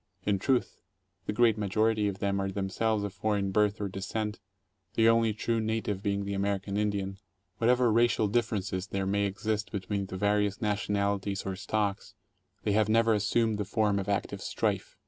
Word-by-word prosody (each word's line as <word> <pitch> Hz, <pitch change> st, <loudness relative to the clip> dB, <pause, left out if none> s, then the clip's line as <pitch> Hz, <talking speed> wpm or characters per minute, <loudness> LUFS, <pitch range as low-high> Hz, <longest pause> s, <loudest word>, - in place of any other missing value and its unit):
In 100 Hz, -2 st, +2 dB
truth, 130 Hz, +4 st, 0 dB, 0.5 s
the -, -, +1 dB
great 110 Hz, 0 st, +3 dB
majority 110 Hz, +1 st, +1 dB
of 100 Hz, -1 st, -3 dB
them 100 Hz, 0 st, 0 dB
are 95 Hz, -, -1 dB
themselves 100 Hz, +2 st, -1 dB
of 100 Hz, -2 st, -4 dB
foreign 100 Hz, 0 st, 0 dB
birth 105 Hz, +1 st, +2 dB
or 100 Hz, -, -1 dB
descent, 105 Hz, +3 st, -4 dB, 0.6 s
the 115 Hz, 0 st, +4 dB
only 115 Hz, -1 st, +4 dB
true 115 Hz, +2 st, -1 dB
native 110 Hz, -3 st, -1 dB
being 100 Hz, -1 st, -1 dB
the 100 Hz, -, -3 dB
American 100 Hz, 0 st, -1 dB
Indian. 100 Hz, -2 st, -1 dB, 0.4 s
What 115 Hz, -, +3 dB
ever 125 Hz, -2 st, +4 dB
racial 115 Hz, -1 st, +3 dB
differences 100 Hz, -4 st, -1 dB
there 95 Hz, 0 st, -2 dB
may 100 Hz, +1 st, +1 dB
exist 105 Hz, +2 st, -2 dB
between 100 Hz, 0 st, -2 dB
the 95 Hz, -, -6 dB
various 105 Hz, +1 st, +1 dB
national 100 Hz, -2 st, 0 dB
ities 100 Hz, 0 st, -4 dB
or 95 Hz, -1 st, -2 dB
stocks, 100 Hz, 0 st, -2 dB, 0.5 s
they 105 Hz, -, +1 dB
have 105 Hz, +1 st, +2 dB
never 115 Hz, 0 st, +4 dB
assumed 110 Hz, +1 st, +1 dB
the -, -, +1 dB
form 105 Hz, 0 st, +1 dB
of 100 Hz, +1 st, -4 dB
active 100 Hz, -, -1 dB
strife. -, -, -2 dB
105 Hz, 180 wpm, -29 LUFS, 100-110 Hz, 0.6 s, the